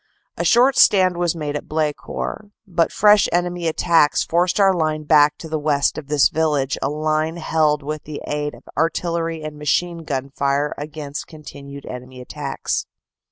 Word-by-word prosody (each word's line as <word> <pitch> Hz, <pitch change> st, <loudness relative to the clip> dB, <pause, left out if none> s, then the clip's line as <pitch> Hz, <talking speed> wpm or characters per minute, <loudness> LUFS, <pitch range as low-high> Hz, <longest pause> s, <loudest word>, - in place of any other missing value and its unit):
A -, -, -2 dB
short 250 Hz, +3 st, +4 dB
stand 185 Hz, -3 st, +5 dB
was 175 Hz, -1 st, 0 dB
made 150 Hz, -2 st, -4 dB
at 150 Hz, -, -5 dB
Blecourt, 155 Hz, +6 st, -3 dB, 0.2 s
but 170 Hz, -4 st, 0 dB
fresh 210 Hz, 0 st, +5 dB
enemy 175 Hz, 0 st, -1 dB
attacks 160 Hz, -1 st, +3 dB
forced 175 Hz, +3 st, +1 dB
our 195 Hz, -1 st, +5 dB
line 155 Hz, -3 st, -1 dB
back 150 Hz, -1 st, +4 dB
to 160 Hz, -1 st, -4 dB
west 145 Hz, -1 st, +1 dB
of 155 Hz, -3 st, -7 dB
this 150 Hz, -1 st, +4 dB
village 150 Hz, -4 st, 0 dB
a 135 Hz, -, 0 dB
line 155 Hz, +2 st, -1 dB
held 155 Hz, -3 st, +1 dB
with 150 Hz, +1 st, -5 dB
the 150 Hz, -1 st, -6 dB
aid 150 Hz, 0 st, -3 dB
of -, -, -17 dB
artillery 165 Hz, 0 st, -1 dB
and 150 Hz, -1 st, -7 dB
machine 170 Hz, +4 st, 0 dB
gun 140 Hz, -4 st, -4 dB
fire 140 Hz, +2 st, 0 dB
against 150 Hz, -1 st, -7 dB
continued 140 Hz, -3 st, -11 dB
enemy 125 Hz, +1 st, -9 dB
attacks." 140 Hz, +2 st, -4 dB
155 Hz, 160 wpm, -21 LUFS, 145-170 Hz, 0.2 s, stand